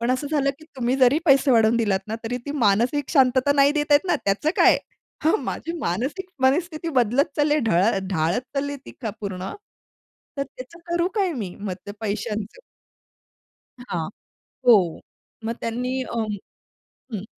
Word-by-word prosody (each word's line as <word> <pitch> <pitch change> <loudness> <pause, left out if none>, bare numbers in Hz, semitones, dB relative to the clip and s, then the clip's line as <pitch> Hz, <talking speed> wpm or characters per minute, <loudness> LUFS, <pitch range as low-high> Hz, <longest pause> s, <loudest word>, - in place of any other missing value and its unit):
पण 235 +1 0
असं 260 +3 0
झालं, 280 -3 +2
की 310 - -15
तुम्ही 250 +1 0
जरी 265 +2 +5
पैसे 275 -3 +5
वाढवून 230 -1 +4
दिलात 205 -5 +1
ना 220 - -2
तरी 235 +2 -2
ती - - -3
मानसिक 240 +8 +2
शांतता 260 -1 +4
नाही 280 0 +4
देता 295 -1 +2
येत 290 +6 +3
ना, 355 - +2
त्याचं 200 +10 +1
काय? - - +6 0.5
हां, 320 +7 +4
माझी 330 - -4
मानसिक 265 - -2 0.2
मनस्थिती 320 +4 +1
बदलत 245 +4 +3
चालली 295 0 +3
आहे, 300 - +1
ढळ 195 0 +3
ढाळत 165 +4 +1
चालली 285 +1 -2
ती - - -8
का 225 -4 -2
पूर्ण. 190 -2 -4 0.9
तर 275 - +2
त्याचं 270 +6 -12
करू 345 +1 +1
काय 390 -5 +1
मी? 210 - -5
मग 200 -2 -3
त्या 205 - -7
पैशांच? 210 - -3 1.2
हां, 170 -10 -3 0.6
हो. 195 -9 +5 0.4
मग 230 +1 -2
त्यांनी 245 +3 -2
अ, 255 - -7 1.0
हं. 205 -2 -4
250 Hz, 160 wpm, -23 LUFS, 210-290 Hz, 1.2 s, काय